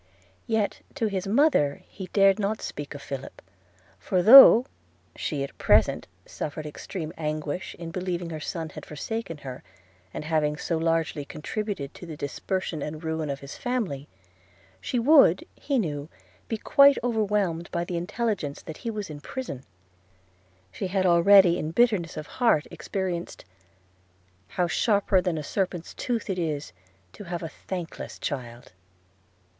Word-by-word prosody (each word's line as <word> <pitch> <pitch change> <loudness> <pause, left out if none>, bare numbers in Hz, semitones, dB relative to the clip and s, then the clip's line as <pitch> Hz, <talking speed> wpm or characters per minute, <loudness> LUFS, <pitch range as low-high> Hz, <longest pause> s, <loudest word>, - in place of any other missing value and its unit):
Yet, 220 -3 0
to 250 -6 0
his 195 -2 -2
mother 205 - +3
he 190 -2 -8
dared 195 +1 +4
not 210 +1 -1
speak 145 0 -6
of 140 - -9
Philip; 135 -2 -7 0.6
for, 180 - 0
though 250 +1 +10 0.5
she 145 -3 -2
at 140 - -7
present - - +3 0.2
suffered 155 +1 -5
extreme 160 +2 -6
anguish 155 +2 -3
in 165 -1 -7
believing 175 -1 -3
her 155 - -5
son 160 +1 -4
had - - -10
forsaken 165 +3 -5
her, 130 -1 -6 0.5
after 150 - -6
having 150 -2 +1
so 165 0 -2
largely 165 -2 0
contributed 155 0 -5
to 175 - -11
the 155 -2 -7
dispersion 160 +3 -3
and 155 +2 -5
ruin 160 -1 -2
of 140 0 -4
his 140 0 -9
family, 200 - -2 0.7
she 250 - -3
would, 245 - +5
he 280 -2 -2
knew, 150 - -2 0.4
be 225 - -2
quite 280 +4 +6
overwhelmed 205 -7 0
by 170 - -2
the 175 - -4
intelligence 190 -5 -2
that 160 - -8
he 230 - -5
was 210 -3 -4
in 150 -2 -8
prison. 225 - -6 1.1
She 190 - -4
had 190 0 0
already 175 +1 +6
in 155 - -3
bitterness 205 -3 +2
of 155 - -5 0.2
heart 190 -11 +4
experienced 185 -3 -4 0.5
– 90 0 -37
'How 175 - 0
sharper 200 +1 +2
than 180 -3 -1
a 155 - -4
serpent's 180 0 -3
tooth 235 -3 -3
it 190 -3 -2
is 150 - -3 0.4
To 205 - -10
have 175 -1 -4
a - - -3
thankless 175 0 -7
child.' 120 -4 -6
170 Hz, 150 wpm, -26 LUFS, 150-205 Hz, 1.1 s, though